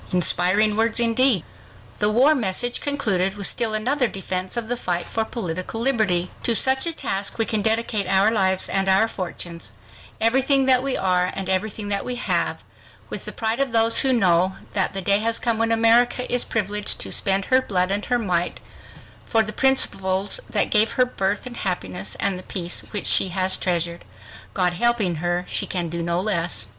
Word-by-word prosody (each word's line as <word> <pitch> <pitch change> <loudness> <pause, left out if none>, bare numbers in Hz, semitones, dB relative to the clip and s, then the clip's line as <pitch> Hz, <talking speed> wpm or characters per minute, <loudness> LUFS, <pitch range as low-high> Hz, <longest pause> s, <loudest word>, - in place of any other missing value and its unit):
Inspiring 185 +4 +2
words 225 +1 0
indeed! 235 - +2 0.6
The 210 - +3
war 255 +8 +4
message 245 -1 0
concluded 205 -10 0
with 200 -1 -5
still 220 +1 +1
another 250 +4 0
defense 190 0 -4
of 235 -2 -3
the 245 - -1
fight 175 -7 -3
for 225 - -2
political 185 -2 -5
liberty: 215 -8 +1
"To 235 - 0
such 265 +6 +4
a - - 0
task 195 -10 -2
we 225 - +1
can 220 -2 -1
dedicate 220 -2 0
our 195 +3 +3
lives 190 -4 +1
and 195 0 0
our 195 +4 +4
fortunes, 175 -4 -6 0.5
everything 265 +4 +2
that 255 -1 +4
we 270 0 -2
are 180 -1 +1
and 195 -1 -5
everything 205 +2 -2
that 200 -1 -1
we 250 - -4
have, 245 - -1 0.5
with - - -5
the - - -4
pride 225 +2 -3
of 275 -4 -1
those 225 0 +4
who 265 - +2
know 185 -5 +2 0.2
that 195 -1 -1
the 195 - -3
day 200 +2 +2
has 230 +1 0
come 230 -2 -1
when 230 0 +1
America 235 +2 +3
is 245 - +1
privileged 210 -1 0
to - - -2
spend 195 -1 +2
her 260 0 +3
blood 185 -5 -1
and 205 +1 -2
her 245 - +1
might 180 -6 -2 0.7
for 225 -2 +2
the 215 0 -6
principles 195 -7 +1
that - - -1
gave 215 +1 +2
her 255 - +3
birth 200 -3 -3
and 245 -1 -8
happiness 100 - -4
and 195 -2 -1
the 185 - -14
peace 175 -3 -3
which 205 - -4
she - - +5
has 185 +1 +3
treasured. 170 -1 -2 0.5
God 180 -2 +1
helping 210 -4 0
her, 175 +2 -2
she - - 0
can 175 -3 -2
do 170 +1 -4
no 170 +1 -1
less." 175 - -1
205 Hz, 190 wpm, -22 LUFS, 185-230 Hz, 0.7 s, she